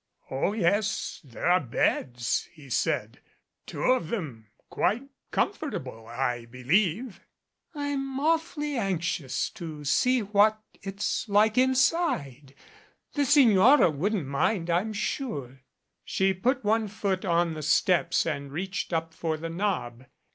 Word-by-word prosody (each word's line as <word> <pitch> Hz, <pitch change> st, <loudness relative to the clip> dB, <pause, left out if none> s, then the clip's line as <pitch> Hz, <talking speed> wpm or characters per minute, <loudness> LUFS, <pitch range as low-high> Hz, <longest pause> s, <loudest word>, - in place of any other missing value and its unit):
"Oh, 135 Hz, +9 st, 0 dB
yes, 205 Hz, +1 st, 0 dB
there 125 Hz, -5 st, -7 dB
are 180 Hz, +1 st, +5 dB
beds," 120 Hz, -, -1 dB
he 140 Hz, -5 st, -14 dB
said; -, -, -1 dB, 0.5 s
"two -, -, -5 dB
of 255 Hz, -10 st, +2 dB
them 140 Hz, -, -5 dB, 0.2 s
quite 220 Hz, +8 st, 0 dB, 0.3 s
comfortable, 130 Hz, -, -3 dB
I 120 Hz, 0 st, -2 dB
believe." 175 Hz, -, 0 dB, 0.5 s
"I'm 275 Hz, -2 st, -3 dB
awfully 300 Hz, -2 st, 0 dB
anxious 175 Hz, -, -1 dB
to 155 Hz, -4 st, -8 dB
see 250 Hz, -, +3 dB
what 210 Hz, +1 st, +3 dB, 0.2 s
it's 195 Hz, +2 st, -3 dB
like 210 Hz, +2 st, +4 dB
inside. 255 Hz, -, +1 dB, 0.6 s
The 290 Hz, -1 st, +1 dB
Signora 250 Hz, -, +6 dB
wouldn't 180 Hz, +4 st, -1 dB
mind, 165 Hz, +6 st, 0 dB
I'm 185 Hz, +6 st, +1 dB
sure 200 Hz, -, -4 dB, 0.2 s
" -, -, -53 dB
She 190 Hz, 0 st, +1 dB
put 245 Hz, +8 st, 0 dB
one 220 Hz, +1 st, +2 dB
foot 200 Hz, -2 st, -2 dB
on 170 Hz, -2 st, +1 dB
the 155 Hz, -, -6 dB
steps 160 Hz, +4 st, +2 dB
and 140 Hz, -2 st, -3 dB
reached 185 Hz, +6 st, -4 dB
up 165 Hz, -1 st, -2 dB
for 160 Hz, -1 st, -2 dB
the 165 Hz, +1 st, -5 dB
knob. 165 Hz, -, -2 dB
190 Hz, 125 wpm, -27 LUFS, 145-225 Hz, 0.6 s, Signora